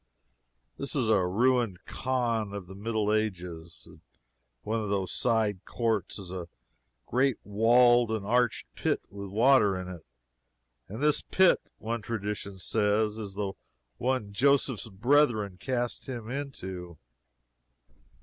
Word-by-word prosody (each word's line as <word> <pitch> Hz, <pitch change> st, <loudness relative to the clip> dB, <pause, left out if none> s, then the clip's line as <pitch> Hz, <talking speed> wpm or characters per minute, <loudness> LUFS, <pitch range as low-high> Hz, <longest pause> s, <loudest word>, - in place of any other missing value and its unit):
This 140 Hz, -, -4 dB
is 125 Hz, -6 st, +1 dB
a 100 Hz, -5 st, +3 dB
ruined 115 Hz, -1 st, +1 dB
Khan 120 Hz, -5 st, -1 dB
of 100 Hz, -2 st, -5 dB
the 95 Hz, -, -11 dB
Middle 105 Hz, +1 st, -1 dB
Ages, 90 Hz, -6 st, -3 dB
in -, -, -16 dB, 0.6 s
one 110 Hz, +2 st, -1 dB
of 105 Hz, -2 st, -3 dB
whose 95 Hz, -2 st, -1 dB
side 110 Hz, -5 st, 0 dB
courts 115 Hz, -4 st, -1 dB
is 95 Hz, -3 st, -9 dB
a 90 Hz, -2 st, -5 dB, 0.6 s
great 130 Hz, +1 st, +2 dB
walled 120 Hz, +3 st, +5 dB
and 110 Hz, -3 st, -2 dB
arched 120 Hz, +2 st, +1 dB
pit -, -, -1 dB
with 100 Hz, 0 st, -7 dB
water 110 Hz, -2 st, +4 dB
in 90 Hz, 0 st, -5 dB
it, 90 Hz, -3 st, -8 dB, 0.8 s
and 110 Hz, +7 st, -7 dB
this 150 Hz, 0 st, +3 dB
pit, 190 Hz, -1 st, +4 dB, 0.2 s
one 115 Hz, +1 st, -3 dB
tradition 105 Hz, -2 st, -4 dB
says, 105 Hz, +2 st, +1 dB
is 100 Hz, -3 st, -6 dB
the 100 Hz, -1 st, -2 dB, 0.4 s
one 125 Hz, -5 st, -1 dB
Joseph's 130 Hz, -2 st, +2 dB
brethren 110 Hz, -3 st, +2 dB
cast 120 Hz, +1 st, -2 dB
him 120 Hz, -2 st, -5 dB
into. 95 Hz, -, -6 dB
110 Hz, 130 wpm, -29 LUFS, 100-120 Hz, 0.8 s, walled